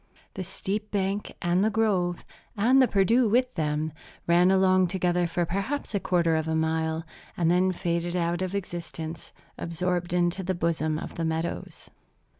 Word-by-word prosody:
The 185 Hz, -, -4 dB
steep 200 Hz, +3 st, -4 dB
bank, 200 Hz, 0 st, -1 dB
and 175 Hz, +2 st, +2 dB
the 215 Hz, -, +3 dB
grove, 195 Hz, -6 st, 0 dB, 0.3 s
and 250 Hz, +6 st, +5 dB
the 260 Hz, -, +5 dB
Perdu 225 Hz, +4 st, +3 dB
with 250 Hz, +3 st, +2 dB
them, 155 Hz, -1 st, -1 dB, 0.3 s
ran 175 Hz, +2 st, +5 dB
along 185 Hz, -1 st, +4 dB
together 180 Hz, -1 st, +1 dB
for 170 Hz, +1 st, -1 dB
perhaps 200 Hz, -, -3 dB
a 200 Hz, -, +1 dB
quarter 170 Hz, -3 st, +2 dB
of 160 Hz, 0 st, -1 dB
a 160 Hz, -, 0 dB
mile, 160 Hz, 0 st, 0 dB, 0.3 s
and 170 Hz, -1 st, +2 dB
then 185 Hz, +1 st, +3 dB
faded 170 Hz, 0 st, -2 dB
out 170 Hz, 0 st, 0 dB
of 185 Hz, +1 st, -2 dB
existence, 170 Hz, -3 st, -6 dB, 0.3 s
absorbed 175 Hz, +1 st, -2 dB
into 175 Hz, +1 st, +1 dB
the 185 Hz, 0 st, -2 dB
bosom 160 Hz, -2 st, 0 dB
of -, -, -7 dB
the 165 Hz, -, -1 dB
meadows. 160 Hz, +1 st, -4 dB
175 Hz, 165 wpm, -27 LUFS, 170-195 Hz, 0.3 s, and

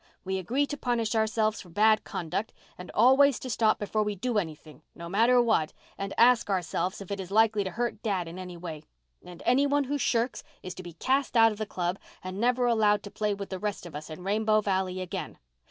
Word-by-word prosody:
We 190 Hz, 0 st, -2 dB
agree 255 Hz, +10 st, 0 dB
to 290 Hz, 0 st, -5 dB
punish 240 Hz, -4 st, -1 dB
ourselves 220 Hz, -1 st, +1 dB
for 180 Hz, -, -14 dB
bad 215 Hz, +5 st, +3 dB
conduct, 175 Hz, +6 st, -4 dB, 0.2 s
and 180 Hz, -, -10 dB
always 265 Hz, +4 st, +5 dB
to 255 Hz, -, -6 dB
stop 220 Hz, -1 st, +2 dB
before 215 Hz, +1 st, -1 dB
we 210 Hz, -1 st, -1 dB
do 225 Hz, +3 st, 0 dB
anything, 155 Hz, -3 st, -8 dB
no 170 Hz, 0 st, -8 dB
matter 230 Hz, +7 st, +4 dB
what, 220 Hz, -10 st, +2 dB, 0.2 s
and 195 Hz, 0 st, -5 dB
ask 240 Hz, -2 st, +5 dB
ourselves 185 Hz, 0 st, -1 dB
if 195 Hz, -, -9 dB
it 200 Hz, -, -3 dB
is 185 Hz, -2 st, -6 dB
likely 215 Hz, 0 st, +3 dB
to 190 Hz, -, -3 dB
hurt 235 Hz, +2 st, -3 dB
dad 190 Hz, -6 st, -1 dB
in 170 Hz, +3 st, -8 dB
any 180 Hz, -1 st, -7 dB
way, 165 Hz, -3 st, -7 dB, 0.4 s
and 175 Hz, -1 st, -11 dB
any 270 Hz, +4 st, +4 dB
one 285 Hz, 0 st, +2 dB
who 285 Hz, +2 st, -2 dB
shirks 240 Hz, -1 st, 0 dB, 0.2 s
is 185 Hz, -, -6 dB
to 185 Hz, -, -9 dB
be 175 Hz, -2 st, -10 dB
cast 260 Hz, -, 0 dB
out 225 Hz, 0 st, +7 dB
of 210 Hz, -, -8 dB
the 215 Hz, -, -3 dB
club 180 Hz, 0 st, -2 dB, 0.2 s
and 185 Hz, +1 st, -6 dB
never 245 Hz, +1 st, +2 dB
allowed 215 Hz, -3 st, +3 dB
to 205 Hz, -, -9 dB
play 210 Hz, -1 st, -1 dB
with 200 Hz, 0 st, -7 dB
the 190 Hz, -, -4 dB
rest 210 Hz, -2 st, -3 dB
of 175 Hz, -, -10 dB
us 150 Hz, +2 st, -7 dB
in 155 Hz, +3 st, -8 dB
Rainbow 215 Hz, +2 st, +2 dB
Valley 190 Hz, -2 st, -1 dB
again. 185 Hz, -, -5 dB
210 Hz, 225 wpm, -28 LUFS, 185-230 Hz, 0.4 s, out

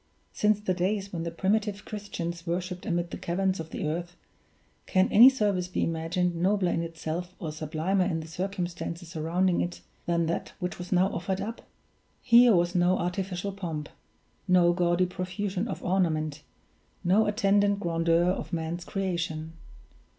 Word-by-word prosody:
Since 210 Hz, 0 st, +2 dB
the 190 Hz, -3 st, 0 dB
days 195 Hz, +2 st, -1 dB
when 170 Hz, -, -3 dB
the -, -, -1 dB
primitive 205 Hz, +4 st, -1 dB
Christians 170 Hz, -5 st, -5 dB
worshiped 180 Hz, +1 st, -3 dB
amid 175 Hz, 0 st, -1 dB
the -, -, -6 dB
caverns 190 Hz, +2 st, 0 dB
of 160 Hz, 0 st, -6 dB
the 155 Hz, -, -3 dB
earth, 170 Hz, +3 st, -3 dB, 0.7 s
can 185 Hz, 0 st, +3 dB
any 240 Hz, +5 st, +10 dB
service 205 Hz, -8 st, 0 dB
be 180 Hz, -, -1 dB
imagined 165 Hz, +2 st, 0 dB
nobler 185 Hz, +1 st, +2 dB
in -, -, 0 dB
itself, 165 Hz, +2 st, -5 dB
or 160 Hz, -, -5 dB
sublimer 160 Hz, +5 st, 0 dB
in 170 Hz, -3 st, -1 dB
the 160 Hz, -, -7 dB
circumstances 175 Hz, -1 st, -4 dB
surrounding 175 Hz, +2 st, +1 dB
it, 175 Hz, -, -4 dB, 0.3 s
than 170 Hz, -1 st, +2 dB
that 165 Hz, +1 st, -3 dB
which 180 Hz, -2 st, -4 dB
was 180 Hz, -, -7 dB
now 185 Hz, +1 st, +4 dB
offered 190 Hz, +2 st, -2 dB
up? 220 Hz, +4 st, -5 dB, 0.6 s
Here 235 Hz, -2 st, +7 dB
was 175 Hz, 0 st, +2 dB
no 180 Hz, +1 st, +3 dB
artificial 185 Hz, +2 st, -2 dB
pomp, 165 Hz, -6 st, -5 dB, 0.6 s
no 180 Hz, -2 st, +5 dB
gaudy 175 Hz, 0 st, +2 dB
profusion 185 Hz, +3 st, -3 dB
of -, -, -5 dB
ornament, 155 Hz, -5 st, 0 dB, 0.6 s
no 200 Hz, +5 st, +4 dB
attendant 205 Hz, -1 st, +2 dB
grandeur 165 Hz, -2 st, +2 dB
of 180 Hz, +1 st, -1 dB
man's 170 Hz, 0 st, -3 dB
creation. 170 Hz, -5 st, -3 dB
180 Hz, 155 wpm, -28 LUFS, 170-195 Hz, 0.7 s, any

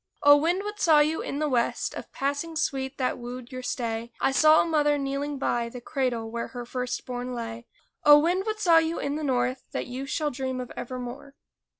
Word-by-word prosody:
O, 290 Hz, 0 st, +9 dB
wind! 340 Hz, +6 st, +1 dB
what 415 Hz, 0 st, -6 dB
saw 320 Hz, -5 st, +5 dB
you 305 Hz, +2 st, +2 dB
in 280 Hz, -, -4 dB
the 305 Hz, +1 st, 0 dB
West 245 Hz, -4 st, 0 dB
Of -, -, -8 dB
passing 285 Hz, +4 st, -2 dB
sweet 270 Hz, -3 st, -2 dB
that 255 Hz, -1 st, -1 dB
wooed 245 Hz, +1 st, -8 dB
your 255 Hz, 0 st, -5 dB
stay? 235 Hz, -2 st, -3 dB
I -, -, +2 dB
saw 310 Hz, +3 st, +6 dB
a -, -, +3 dB
mother 295 Hz, -3 st, +2 dB
kneeling 280 Hz, +1 st, -2 dB
by 240 Hz, -3 st, -1 dB
The 250 Hz, -, -8 dB
cradle 240 Hz, -3 st, -2 dB
where 235 Hz, 0 st, -3 dB
her 245 Hz, -1 st, -7 dB
first 250 Hz, 0 st, -4 dB
born 250 Hz, 0 st, -4 dB
lay. 230 Hz, 0 st, -6 dB, 0.4 s
O, 295 Hz, 0 st, +9 dB
wind! 355 Hz, +7 st, +1 dB
what 430 Hz, 0 st, -2 dB
saw 340 Hz, -5 st, +6 dB
you 325 Hz, +1 st, -1 dB
in 280 Hz, -, -2 dB
the 310 Hz, -, -3 dB
North 255 Hz, -1 st, 0 dB
That -, -, -2 dB
you 260 Hz, +2 st, -6 dB
shall 295 Hz, +1 st, -1 dB
dream 260 Hz, 0 st, -3 dB
of 250 Hz, -1 st, -6 dB
evermore? 255 Hz, +3 st, -7 dB
270 Hz, 215 wpm, -26 LUFS, 245-300 Hz, 0.4 s, O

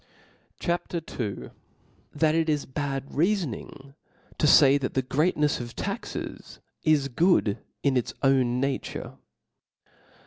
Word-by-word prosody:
CHAP. 175 Hz, 0 st, -2 dB
II. 170 Hz, -, -1 dB
T!hat 145 Hz, -, -4 dB
it 165 Hz, 0 st, +1 dB
is 150 Hz, -2 st, 0 dB
bad 135 Hz, 0 st, -3 dB
Reafoning 150 Hz, -, -2 dB, 0.5 s
to 150 Hz, -, +3 dB
fay 140 Hz, -1 st, +7 dB
that 130 Hz, -, -4 dB
the 130 Hz, -, +2 dB
Great 150 Hz, +7 st, +1 dB
nefs 150 Hz, -3 st, +1 dB
of 120 Hz, -1 st, -8 dB
Taxes -, -, -5 dB, 0.2 s
is 150 Hz, -3 st, +3 dB
good 140 Hz, -, +2 dB, 0.2 s
in 140 Hz, -2 st, +2 dB
its 125 Hz, -, -1 dB
own 130 Hz, -2 st, +3 dB
Nature. 135 Hz, 0 st, -3 dB
140 Hz, 125 wpm, -26 LUFS, 130-155 Hz, 0.5 s, fay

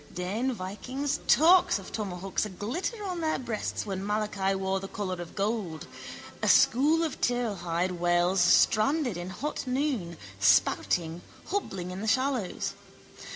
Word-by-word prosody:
Dane 205 Hz, +9 st, -1 dB
vikings, 250 Hz, +7 st, -3 dB
torcs 350 Hz, +4 st, +6 dB
of -, -, -10 dB
tomahawks 195 Hz, -3 st, -3 dB
aglitter 245 Hz, -, -4 dB
on 360 Hz, -2 st, -3 dB
their 315 Hz, -1 st, 0 dB
breasts 235 Hz, -4 st, -3 dB
when 195 Hz, -2 st, -4 dB
Malachi 205 Hz, -2 st, 0 dB
wore 190 Hz, 0 st, -1 dB
the 195 Hz, -, -6 dB
collar 185 Hz, -3 st, -4 dB
of 170 Hz, -, -9 dB
gold. 200 Hz, -6 st, -2 dB, 0.6 s
A -, -, 0 dB
school 305 Hz, +7 st, +4 dB
of 315 Hz, -, -4 dB
turlehide 185 Hz, -7 st, -1 dB
whales 175 Hz, +2 st, +2 dB
stranded 245 Hz, -, +3 dB
in 175 Hz, +1 st, -5 dB
hot 270 Hz, +9 st, -4 dB
noon, 250 Hz, -, -1 dB, 0.2 s
spouting, 160 Hz, -, +2 dB, 0.3 s
hobbling 195 Hz, -, -3 dB
in 185 Hz, +2 st, -6 dB
the 220 Hz, -, -3 dB
shallows. 255 Hz, -5 st, 0 dB
205 Hz, 135 wpm, -28 LUFS, 180-260 Hz, 0.6 s, torcs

